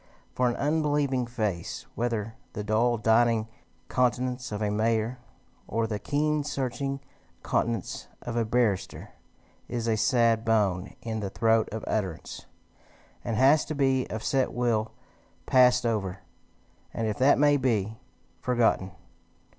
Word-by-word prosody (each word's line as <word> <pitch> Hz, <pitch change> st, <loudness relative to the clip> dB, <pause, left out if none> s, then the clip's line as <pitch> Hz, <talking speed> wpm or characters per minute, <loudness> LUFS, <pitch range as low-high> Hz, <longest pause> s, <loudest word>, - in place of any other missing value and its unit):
For 125 Hz, -1 st, +2 dB
an 120 Hz, -, -2 dB
unbelieving 145 Hz, -4 st, +1 dB
face, 105 Hz, -8 st, -3 dB
whether 115 Hz, -2 st, -2 dB, 0.2 s
the 105 Hz, -, -4 dB
dull 115 Hz, +3 st, +2 dB
dining 115 Hz, 0 st, +3 dB, 0.4 s
countenance 125 Hz, 0 st, 0 dB
of 105 Hz, -, -3 dB
a 105 Hz, -1 st, 0 dB
mayor, 110 Hz, +3 st, 0 dB, 0.5 s
or 115 Hz, +1 st, 0 dB
the 105 Hz, -2 st, -3 dB
keen 150 Hz, +3 st, 0 dB
searching 135 Hz, -1 st, -3 dB, 0.4 s
countenance 115 Hz, -4 st, -1 dB, 0.2 s
of 120 Hz, -, -4 dB
a 120 Hz, -, +2 dB
barrister, 110 Hz, -3 st, -1 dB, 0.6 s
is 115 Hz, -1 st, -3 dB
a 115 Hz, -, +2 dB
sad 115 Hz, 0 st, +3 dB
bone 105 Hz, -4 st, +1 dB
in 110 Hz, -1 st, -3 dB
the 100 Hz, -2 st, -3 dB
throat 115 Hz, +2 st, +2 dB
of 110 Hz, 0 st, -5 dB
utterance, 95 Hz, -6 st, -3 dB, 0.8 s
and 115 Hz, -2 st, -2 dB
has 140 Hz, +4 st, +5 dB
to 155 Hz, -, -4 dB
be 135 Hz, -2 st, +2 dB
of 110 Hz, 0 st, -5 dB
set 135 Hz, -1 st, +1 dB
will 115 Hz, -3 st, 0 dB, 0.5 s
passed 125 Hz, +1 st, +5 dB
over, 100 Hz, -5 st, -1 dB, 0.7 s
and, 115 Hz, -, -1 dB
if 105 Hz, -1 st, -2 dB
that 130 Hz, +2 st, +5 dB
may 145 Hz, 0 st, +5 dB
be, 110 Hz, -5 st, 0 dB, 0.4 s
forgotten. 115 Hz, -6 st, +1 dB
115 Hz, 135 wpm, -27 LUFS, 110-125 Hz, 0.8 s, has